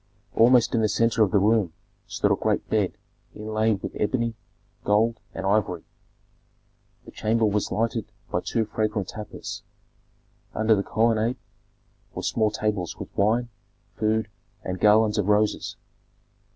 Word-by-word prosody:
Almost 120 Hz, +1 st, +5 dB
in 115 Hz, -, +2 dB
the 110 Hz, -, +2 dB
centre 115 Hz, +1 st, +2 dB
of 105 Hz, -, +5 dB
the 100 Hz, -, +2 dB
room 100 Hz, -4 st, +2 dB, 0.3 s
stood -, -, 0 dB
a -, -, +5 dB
great -, -, -1 dB
bed -, -, +1 dB, 0.4 s
inlaid 110 Hz, -1 st, 0 dB
with -, -, -5 dB
ebony, 115 Hz, +1 st, 0 dB, 0.5 s
gold, 110 Hz, +2 st, +2 dB, 0.2 s
and 95 Hz, -, -4 dB
ivory. 95 Hz, -4 st, +1 dB, 1.2 s
The -, -, -11 dB
chamber 110 Hz, +1 st, +1 dB
was 105 Hz, -1 st, 0 dB
lighted 115 Hz, -1 st, -1 dB, 0.2 s
by -, -, 0 dB
two 115 Hz, -, -1 dB
fragrant 105 Hz, -2 st, -2 dB
tapers; 105 Hz, 0 st, -7 dB, 0.9 s
under 110 Hz, +1 st, +3 dB
the 100 Hz, -, +2 dB
colonnade 115 Hz, +3 st, +1 dB, 0.8 s
were -, -, -4 dB
small 110 Hz, -2 st, +1 dB
tables 105 Hz, -4 st, -2 dB
with -, -, -9 dB
wine, 115 Hz, +4 st, +2 dB, 0.5 s
food, 110 Hz, 0 st, 0 dB, 0.4 s
and 95 Hz, 0 st, -4 dB
garlands 105 Hz, 0 st, +4 dB
of 100 Hz, -, 0 dB
roses. 105 Hz, 0 st, +1 dB
110 Hz, 140 wpm, -25 LUFS, 105-115 Hz, 1.2 s, Almost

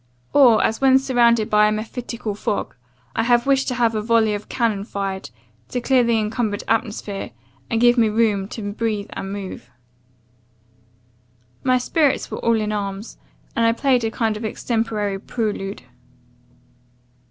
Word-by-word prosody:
Or, 250 Hz, -6 st, +6 dB
as 220 Hz, -, 0 dB
when 265 Hz, -1 st, +6 dB
surrounded 240 Hz, -4 st, +3 dB
by 210 Hz, 0 st, +4 dB
a -, -, +1 dB
mephitical 225 Hz, +1 st, -4 dB
fog, 205 Hz, 0 st, -3 dB, 0.4 s
I -, -, +2 dB
have 240 Hz, +1 st, +3 dB
wished 275 Hz, -1 st, +2 dB
to 250 Hz, -, -1 dB
have 235 Hz, -2 st, +2 dB
a 215 Hz, -, -1 dB
volley 225 Hz, -1 st, +2 dB
of 205 Hz, 0 st, -6 dB
cannon 220 Hz, -5 st, 0 dB
fired, 195 Hz, -, -4 dB, 0.4 s
to 245 Hz, -, -2 dB
clear 255 Hz, +1 st, +3 dB
the 235 Hz, -1 st, +2 dB
incumbered 215 Hz, -1 st, -1 dB
atmosphere, 210 Hz, -3 st, -2 dB, 0.4 s
and 225 Hz, -, 0 dB
give 240 Hz, +1 st, +5 dB
me 225 Hz, -2 st, +4 dB
room 210 Hz, -3 st, +1 dB
to 205 Hz, -1 st, -5 dB
breathe 215 Hz, -2 st, -2 dB
and 195 Hz, -, -5 dB
move. 195 Hz, -11 st, -7 dB, 1.9 s
"My 255 Hz, -1 st, +3 dB
spirits 285 Hz, +3 st, +1 dB
were -, -, -4 dB
all 230 Hz, -1 st, +2 dB
in 210 Hz, 0 st, -2 dB
arms, 200 Hz, +1 st, -5 dB, 0.4 s
and 230 Hz, -, +1 dB
I 230 Hz, 0 st, +4 dB
played 250 Hz, 0 st, +2 dB
a 225 Hz, -, +1 dB
kind 225 Hz, -2 st, -1 dB
of 215 Hz, -, -6 dB
extemporary 215 Hz, -3 st, -2 dB
prelude. 205 Hz, -3 st, -4 dB
225 Hz, 155 wpm, -21 LUFS, 210-240 Hz, 1.9 s, Or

